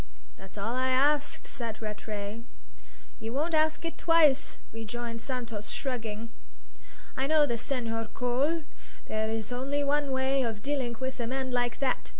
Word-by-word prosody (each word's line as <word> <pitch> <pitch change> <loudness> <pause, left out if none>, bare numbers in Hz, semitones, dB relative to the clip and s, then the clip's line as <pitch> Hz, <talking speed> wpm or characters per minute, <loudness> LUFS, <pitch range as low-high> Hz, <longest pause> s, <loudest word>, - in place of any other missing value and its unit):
"That's 195 +2 -11
all 210 +4 -1
I 260 0 +2
ask," 285 +3 +3
said 230 -4 -4
Rattray. 210 0 -4 0.8
"You 225 0 -4
won't 310 +5 0
ask 315 +1 +3
it 330 0 -4
twice," 310 -4 +5 0.2
rejoined 230 +1 -4
Santos, 230 -5 -4
shrugging. 230 -4 -2 0.9
"I 265 +1 +1
know 310 0 +6
this 235 -5 -1
Senhor 225 -4 -1
Cole. 275 +7 +1 0.4
There 220 0 0
is 220 0 -2
only 275 +4 0
one 285 0 +2
way 265 +1 +2
of 225 -4 -2
dilling 270 -4 0
with 260 0 -3
a 235 - -1
man 260 +1 -1
like 245 -1 +1
that. 265 -2 +1
250 Hz, 155 wpm, -30 LUFS, 225-280 Hz, 0.9 s, know